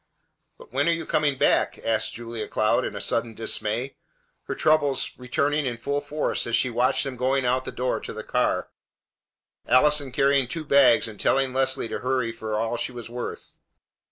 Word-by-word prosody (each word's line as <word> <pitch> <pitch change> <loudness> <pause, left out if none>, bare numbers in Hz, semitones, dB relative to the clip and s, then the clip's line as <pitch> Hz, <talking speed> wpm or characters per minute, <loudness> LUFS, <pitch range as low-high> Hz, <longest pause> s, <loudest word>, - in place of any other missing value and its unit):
"But - - -16
when 145 +5 +2
are - - +4
you 165 -1 -4
coming 145 -3 +1
back?" - - +2
asked 110 -1 0
Julia 115 -1 -6
Cloud 110 0 +1
in - - -4
sudden 115 -2 -1
dismay, 115 +3 -3 0.5
her - - -4
troubles 155 -4 +2
returning 140 +3 0
in 120 -2 -3
full 140 +4 -2
force 145 -2 -2
as 115 - +1
she 125 - +1
watched 125 +3 +1
them 135 -2 -4
going 130 +1 +1
out 130 +1 +1
the - - -5
door 125 0 -1
to - - -7
the - - -7
car, - - 0 1.0
Allison 145 0 +4
carrying 135 0 +3
two 160 +5 -4
bags 140 -6 +5
and 110 -2 -10
telling 135 -1 +2
Leslie 130 -1 +1
to - - -4
hurry 130 -2 0
for 110 -1 -5
all 115 +2 -1
she 120 - -3
was 120 -2 -9
worth. 120 0 -7
130 Hz, 185 wpm, -25 LUFS, 120-140 Hz, 1.0 s, bags